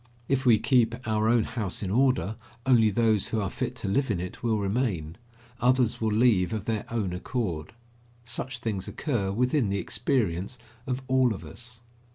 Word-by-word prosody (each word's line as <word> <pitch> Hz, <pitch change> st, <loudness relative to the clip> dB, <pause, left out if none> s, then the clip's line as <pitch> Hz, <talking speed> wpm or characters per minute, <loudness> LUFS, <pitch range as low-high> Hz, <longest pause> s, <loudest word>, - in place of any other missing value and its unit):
If 135 Hz, -1 st, +1 dB
we 115 Hz, -3 st, +7 dB
keep 115 Hz, +1 st, +3 dB
our 110 Hz, 0 st, +2 dB
own 115 Hz, -1 st, +4 dB
house 110 Hz, -4 st, -4 dB
in 95 Hz, -, -2 dB
order, 125 Hz, -4 st, +2 dB, 0.3 s
only 120 Hz, -4 st, +5 dB
those 110 Hz, -1 st, +2 dB
who 110 Hz, -, -1 dB
are 100 Hz, -3 st, -2 dB
fit -, -, -3 dB
to -, -, -5 dB
live 130 Hz, +7 st, +1 dB
in 100 Hz, -5 st, 0 dB
it 90 Hz, +1 st, -6 dB
will 115 Hz, -2 st, +1 dB
remain. 100 Hz, -6 st, -1 dB, 0.4 s
Others 125 Hz, -2 st, +2 dB
will 110 Hz, -1 st, +1 dB
leave 110 Hz, -3 st, +3 dB
of 110 Hz, -2 st, -3 dB
their 110 Hz, -2 st, -1 dB
own 105 Hz, -6 st, -1 dB
accord. 90 Hz, -, -3 dB, 0.5 s
Such 130 Hz, +2 st, -3 dB
things 105 Hz, -5 st, -3 dB
occur 115 Hz, -10 st, -1 dB
within 125 Hz, +2 st, +1 dB
the 100 Hz, -, 0 dB
experience 100 Hz, +1 st, -1 dB, 0.3 s
of 130 Hz, 0 st, -2 dB
all 130 Hz, -3 st, +3 dB
of 95 Hz, -, -10 dB
us. 115 Hz, +9 st, -8 dB
110 Hz, 180 wpm, -27 LUFS, 100-125 Hz, 0.5 s, we